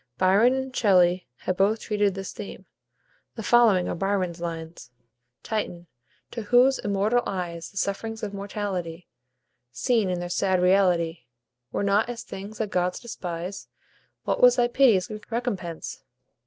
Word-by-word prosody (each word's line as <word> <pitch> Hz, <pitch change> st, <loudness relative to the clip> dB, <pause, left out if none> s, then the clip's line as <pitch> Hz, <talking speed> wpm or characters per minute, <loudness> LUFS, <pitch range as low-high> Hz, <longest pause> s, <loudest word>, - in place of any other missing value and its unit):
Byron 200 Hz, +7 st, +4 dB
and 265 Hz, -1 st, -4 dB
Shelley 180 Hz, -4 st, +3 dB
have 185 Hz, -, -2 dB
both 210 Hz, +3 st, +2 dB
treated 205 Hz, -2 st, 0 dB
this 195 Hz, -1 st, -6 dB
theme. 205 Hz, -, -9 dB, 0.7 s
The 225 Hz, -, -6 dB
following 220 Hz, -6 st, +4 dB
are -, -, -2 dB
Byron's 185 Hz, -2 st, -1 dB
lines: 165 Hz, -5 st, -6 dB, 0.5 s
"Titan! 180 Hz, -6 st, -3 dB, 0.5 s
to 230 Hz, -, -5 dB
whose 245 Hz, +5 st, +4 dB
immortal 205 Hz, +4 st, +1 dB
eyes 175 Hz, -3 st, -4 dB
The 200 Hz, -, -14 dB
sufferings 220 Hz, +4 st, -3 dB
of 205 Hz, -1 st, -4 dB
mortality, 195 Hz, -4 st, -4 dB, 0.6 s
Seen 225 Hz, -, +1 dB
in 180 Hz, -1 st, -1 dB
their 175 Hz, -, -4 dB
sad 185 Hz, +1 st, +1 dB
reality, 180 Hz, -4 st, +2 dB, 0.5 s
Were -, -, -1 dB
not 200 Hz, +3 st, +2 dB
as 235 Hz, -1 st, -5 dB
things 210 Hz, -1 st, -8 dB
that 215 Hz, -2 st, -3 dB
gods 180 Hz, 0 st, 0 dB
despise; 180 Hz, -5 st, -6 dB, 0.6 s
What -, -, -1 dB
was 250 Hz, 0 st, +7 dB
thy 245 Hz, -1 st, +3 dB
pity's 235 Hz, -8 st, +4 dB, 0.2 s
recompense? 210 Hz, -9 st, -4 dB
195 Hz, 140 wpm, -25 LUFS, 180-225 Hz, 0.7 s, was